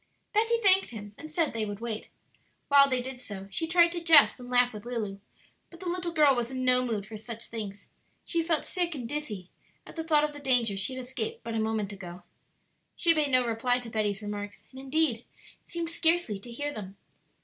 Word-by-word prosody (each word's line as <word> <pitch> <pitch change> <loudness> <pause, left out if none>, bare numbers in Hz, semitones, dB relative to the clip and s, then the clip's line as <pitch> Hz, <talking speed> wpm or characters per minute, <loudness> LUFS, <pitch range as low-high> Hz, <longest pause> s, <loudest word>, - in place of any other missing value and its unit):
Betty 450 +2 +3
thanked 385 -1 +5
him 210 -3 -8
and 310 - -9
said 310 -2 0
they 225 -1 -1
would 205 -1 -4
wait. 225 -2 -4 0.6
While 280 -1 +7
they 255 -2 0
did 260 -1 -7
so 195 -4 -7
she 325 +11 -1
tried 345 0 +5
to 345 0 -4
jest 320 -5 +7
and 245 0 -9
laugh 245 -1 +3
with 210 -1 -8
Lulu; 220 -5 -4 0.5
but 340 - -14
the 370 - -6
little 350 -1 -2
girl 300 -4 +5
was 240 -1 -1
in 260 -1 -3
no 250 0 +4
mood 220 -5 -2
for 220 - -9
such 230 +1 -7
things; 205 -3 -7 0.4
she 335 - +1
felt 325 -1 0
sick 350 -3 -1
and 245 -4 -5
dizzy 220 -10 -5 0.3
at - - -12
the 325 - -3
thought 305 -2 +3
of 300 0 -1
the 290 - -9
danger 250 -7 +2
she 200 +7 -1
had 255 - -5
escaped 250 -3 -4
but 230 - -5
a 225 - 0
moment 220 -2 -1
ago. 180 -2 -9 0.7
She 335 -2 +5
made 305 -3 +1
no 255 -2 +3
reply 235 +2 +1
to 245 -2 -8
Betty's 210 -2 -1
remarks, 205 0 -6
and 260 - -11
indeed 270 -3 0 0.4
seemed 340 -1 -4
scarcely 330 - +1
to 220 - -11
hear 290 +5 -3
them. 195 -4 -8
250 Hz, 215 wpm, -29 LUFS, 215-310 Hz, 0.7 s, While